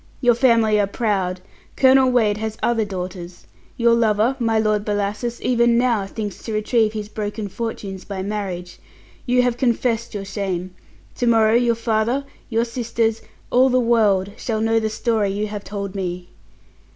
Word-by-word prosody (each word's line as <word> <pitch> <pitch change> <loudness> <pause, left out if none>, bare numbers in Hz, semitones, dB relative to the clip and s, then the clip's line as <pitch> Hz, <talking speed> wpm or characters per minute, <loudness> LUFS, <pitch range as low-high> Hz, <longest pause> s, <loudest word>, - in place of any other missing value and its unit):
Your 245 -2 +4
family 230 -3 +3
are 200 - +2
proud. 195 -4 -1 0.3
Colonel 265 0 +5
Wade 220 -5 +2
has 220 0 -4
other 230 -2 +2
daughters. 180 -2 -7 0.3
Your 235 -1 +4
lover, 225 +2 +2
my 225 -2 +1
Lord 215 -1 +1
Bellasis, 210 +3 -2
even 235 -1 +3
now, 235 -5 +1
thinks 205 -1 -6
to 225 - -5
retrieve 215 +1 +1
his 210 -1 -4
broken 210 0 -4
fortunes 200 -3 -5
by 195 -2 -5
marriage. 185 -3 -5 0.5
You 250 0 +3
have 245 -1 0
confessed 235 -2 0
your 200 -1 -4
shame. 190 -2 -4 0.4
To 245 - 0
morrow 225 -1 +4
your 235 0 +3
father, 230 +4 0 0.2
your 230 -1 +1
sisters, 230 -2 -1 0.3
all 255 +2 +5
the 255 0 +3
world, 210 -5 +2
shall 225 -3 -2
know 225 +1 +2
the 220 -1 -1
story 220 -2 0
you 205 +2 -2
have 205 -1 -6
told 200 -1 -5
me!" 180 -2 -4
220 Hz, 165 wpm, -21 LUFS, 200-235 Hz, 0.5 s, Colonel